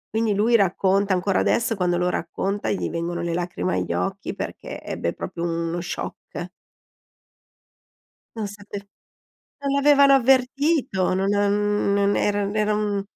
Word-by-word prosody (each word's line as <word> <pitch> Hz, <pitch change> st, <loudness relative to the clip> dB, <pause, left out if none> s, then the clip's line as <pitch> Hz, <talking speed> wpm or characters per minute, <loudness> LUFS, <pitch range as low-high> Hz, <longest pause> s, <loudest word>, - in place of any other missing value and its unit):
Quindi 220 Hz, -2 st, +1 dB
lui 225 Hz, +4 st, +3 dB
racconta 195 Hz, -1 st, +2 dB
ancora 185 Hz, +1 st, +1 dB
adesso, 230 Hz, -1 st, +1 dB
quando 180 Hz, -2 st, +1 dB
lo 180 Hz, 0 st, +1 dB
racconta 195 Hz, +4 st, -2 dB
gli 195 Hz, -, -1 dB
vengono 170 Hz, +1 st, -3 dB
le 170 Hz, -1 st, -2 dB
lacrime 170 Hz, -, -2 dB
agli 90 Hz, -2 st, -2 dB
occhi 90 Hz, +1 st, -3 dB
perché -, -, -6 dB
ebbe 85 Hz, -, -3 dB
proprio 170 Hz, -, -6 dB
uno 170 Hz, 0 st, -2 dB
shock. 175 Hz, -, -6 dB, 1.9 s
Non 220 Hz, -2 st, -3 dB
sape 205 Hz, 0 st, -9 dB, 0.8 s
non 280 Hz, -1 st, -2 dB
l'avevano 280 Hz, 0 st, +6 dB
avvertito, 265 Hz, -, +2 dB
no 190 Hz, +1 st, 0 dB
non 205 Hz, 0 st, +1 dB
non 200 Hz, 0 st, +2 dB
era 205 Hz, 0 st, +1 dB
non 200 Hz, +1 st, -3 dB
era 210 Hz, 0 st, +2 dB
un 205 Hz, -1 st, -1 dB
200 Hz, 140 wpm, -23 LUFS, 175-215 Hz, 1.9 s, l'avevano